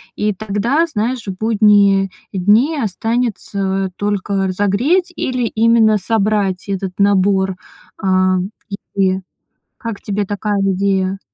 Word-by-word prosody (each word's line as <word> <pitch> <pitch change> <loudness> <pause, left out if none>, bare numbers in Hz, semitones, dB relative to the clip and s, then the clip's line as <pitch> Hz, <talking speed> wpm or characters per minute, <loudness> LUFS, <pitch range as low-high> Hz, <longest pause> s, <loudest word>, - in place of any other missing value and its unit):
И 210 0 0
тогда, 220 - 0
знаешь, 240 -3 -2
в 190 - -4
будние 205 -3 +3 0.2
дни 215 - +2
останется 200 -4 -2
только 200 -1 -1
разогреть 215 - +1
или 255 -1 -2
именно 225 -1 +3
собрать 200 -2 0
этот 195 -1 -3
набор, 195 -1 +2 0.5
э, - - -2
м, 185 0 +2 0.4
и 190 -1 +1 0.6
как 230 -4 -6
тебе 205 0 -2
такая 205 +1 -2
идея? 195 0 0
200 Hz, 110 wpm, -17 LUFS, 190-220 Hz, 0.6 s, будние